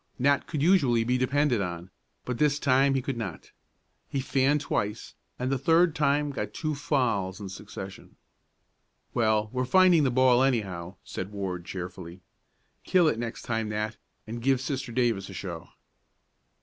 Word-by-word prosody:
Nat 140 +2 +2
could 150 -3 -2
usually 140 -11 +4
be 125 +2 +1
depended 130 -2 +2
on, 90 0 -5 0.3
but 125 -2 -3
this 150 -1 +3
time 135 -1 +3
he 130 - 0
could 135 -2 -3
not. 100 -7 -6 0.6
He 140 - -2
fanned 135 +2 +2
twice 105 -6 -3 0.2
and 125 +1 -2
the 135 - 0
third 165 +3 +4
time 145 -1 +1
got 135 - -5
two 155 -2 -2
fouls 120 -10 0
in 100 -2 -6
succession. 95 0 -9 1.0
"Well, 110 -2 +1
we're 130 0 0
finding 180 +4 +5
the 135 - +3
ball, 130 0 +4
anyhow," 100 -9 -1
said 95 +2 -6
Ward 95 -4 -4
cheerfully. 90 -1 -7 0.6
"Kill 180 -3 +4
it 115 -7 +1
next 115 -1 -5
time, 115 -3 -2
Nat, 105 +1 -2 0.3
and 115 +2 -6
give 135 +1 +2
Sister 130 -1 -3
Davis 115 -5 0
a - - -8
show." 85 -4 -6
125 Hz, 160 wpm, -27 LUFS, 100-140 Hz, 1.0 s, finding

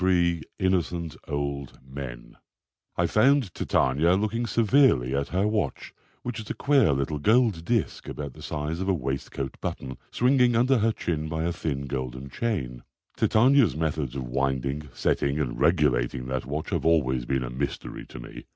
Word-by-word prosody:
163 85 -3 +3 0.2
INNOCENT 90 -3 0
OLD 70 -2 -3
MEN 65 -3 -8 0.6
I - - +3
found 130 - +3
Titania 75 +7 +2
looking 110 +4 -1
severely 115 - +3
at 70 0 0
her 95 +4 +1
watch, 105 -1 -2 0.3
which 120 -1 -4
is 110 - -8
a - - -3
queer 140 - +4
little 70 +2 -1
gold 110 - +3
disk 115 +3 -1
about 70 -3 -5
the - - -13
size 75 +3 -3
of 95 +1 -1
a 95 - +3
waistcoat 70 -1 -4
button, 65 -1 -5
swinging 125 -1 +3
under 125 +2 +4
her 115 +2 +3
chin 80 -7 -3
by 80 0 -2
a 85 +1 0
thin 70 -4 -3
golden 65 0 -5
chain. 70 - -2 0.3
Titania's 125 - +4
methods 75 -5 -2
of 65 - -3
winding, 70 +3 -1
setting 70 +4 0
and 65 -5 -2
regulating 65 -7 +2
that 65 -1 -3
watch 75 +3 -4
have - - 0
always 65 -7 +2
been 65 -1 0
a - - -5
mystery 70 +3 -4
to - - -10
me. - - -10
75 Hz, 165 wpm, -26 LUFS, 65-105 Hz, 0.6 s, queer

